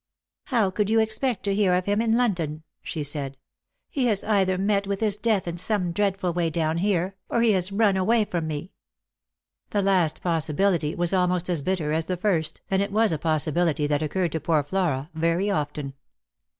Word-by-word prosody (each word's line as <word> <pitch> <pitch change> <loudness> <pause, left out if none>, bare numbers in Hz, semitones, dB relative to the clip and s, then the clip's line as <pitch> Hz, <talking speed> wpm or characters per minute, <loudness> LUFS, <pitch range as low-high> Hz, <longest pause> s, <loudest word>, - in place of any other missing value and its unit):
" - - -67
How 225 -8 +1
could 205 +2 -1
you 225 +1 +3
expect 220 +1 0
to 200 - 0
hear 195 -3 +2
of 180 0 -1
him 205 +2 +1
in 230 0 +2
London? 170 -10 -1
" - - -60
she 155 - -4
said. 140 -2 -1 0.2
" - - -56
He 260 -3 0
has 210 -4 +2
either 190 -3 +1
met 200 +1 +1
with 200 -1 -2
his 215 -3 +1
death 210 -3 0
in 170 0 -4
some 185 -2 +1
dreadful 195 -1 0
way 170 -1 0
down 160 0 -1
here, 190 -1 0 0.2
or 235 - +1
he 230 - +4
has 185 -1 +2
run 200 -1 +2
away 215 +4 +2
from 170 -5 -3
me." 150 -2 -5 1.0
The 205 -1 0
last 185 -5 +1
possibility 165 0 +1
was 175 +1 0
almost 180 -1 +1
as 165 -4 -1
bitter 160 -2 -1
as 160 +1 0
the 185 - -2
first, 170 -5 -1
and 190 0 +2
it 200 0 -2
was 220 0 +3
a 160 - -1
possibility 155 0 +1
that 145 0 0
occurred 170 +2 -1
to 160 - -2
poor 155 -1 +1
Flora 155 -3 -1
very 165 +5 0
often. 145 -4 -3
180 Hz, 205 wpm, -25 LUFS, 160-205 Hz, 1.0 s, he